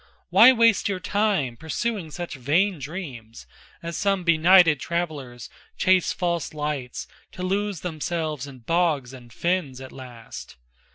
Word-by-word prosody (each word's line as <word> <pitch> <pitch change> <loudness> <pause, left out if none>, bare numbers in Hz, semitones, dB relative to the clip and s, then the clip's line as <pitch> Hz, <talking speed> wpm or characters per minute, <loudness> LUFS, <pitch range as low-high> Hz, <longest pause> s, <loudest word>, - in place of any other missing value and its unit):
Why 260 - +9
waste 230 -4 +3
your 190 -2 -2
time 195 - 0
pursuing 180 - -3
such 175 +3 -6
vain 160 +8 +1
dreams 135 - -8 0.4
As 170 0 -5
some 195 -1 0
benighted 170 -2 +5
travelers 140 - -4 0.3
chase 185 -1 +3
false 170 -3 -2
lights 150 -4 -4 0.3
To 180 - -6
lose 195 -2 -1
themselves 155 -4 -3
in 130 -3 -12
bogs 155 -3 0
and 120 -2 -13
fens 165 -2 -1
at 130 0 -10
last? 120 - -10
160 Hz, 130 wpm, -24 LUFS, 135-185 Hz, 0.4 s, Why